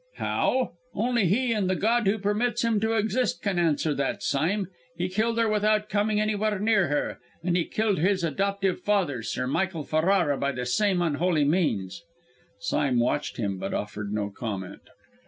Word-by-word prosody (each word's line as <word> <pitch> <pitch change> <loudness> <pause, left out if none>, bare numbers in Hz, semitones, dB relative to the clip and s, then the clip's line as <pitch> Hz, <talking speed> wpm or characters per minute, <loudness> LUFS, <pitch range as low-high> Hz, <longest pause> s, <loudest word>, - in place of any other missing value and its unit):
"How? 255 -1 0 0.2
Only 235 -2 +1
he 235 +6 +2
and 205 -4 0
the 185 - +2
God 230 +2 +1
who 200 +3 +3
permits 215 +4 0
him 230 -2 +2
to 220 +2 0
exist 225 +3 0
can 195 -4 0
answer 160 -2 +1
that, 140 -1 -2
Sime. 180 +8 0 0.3
He 180 - -1
killed 220 +5 0
her 230 -1 +3
without 215 0 +1
coming 210 +1 +1
anywhere 215 0 0
near 205 -2 +2
her 145 +1 -1 0.2
and 175 0 +1
he 175 - +1
killed 215 -5 0
his 185 +2 +2
adoptive 195 +4 0
father, 180 - 0
Sir 115 - -3
Michael 165 +4 -1
Ferrara, 160 -2 +2
by 140 0 0
the 125 -1 -4
same 185 +7 +2
unholy 160 -1 +1
means!" 145 - 0 0.5
Sime 125 +5 0
watched 145 +5 0
him, 100 -5 -2
but - - -3
offered 105 0 -4
no 105 -1 -2
comment. 100 -3 -6
185 Hz, 175 wpm, -26 LUFS, 145-215 Hz, 0.5 s, who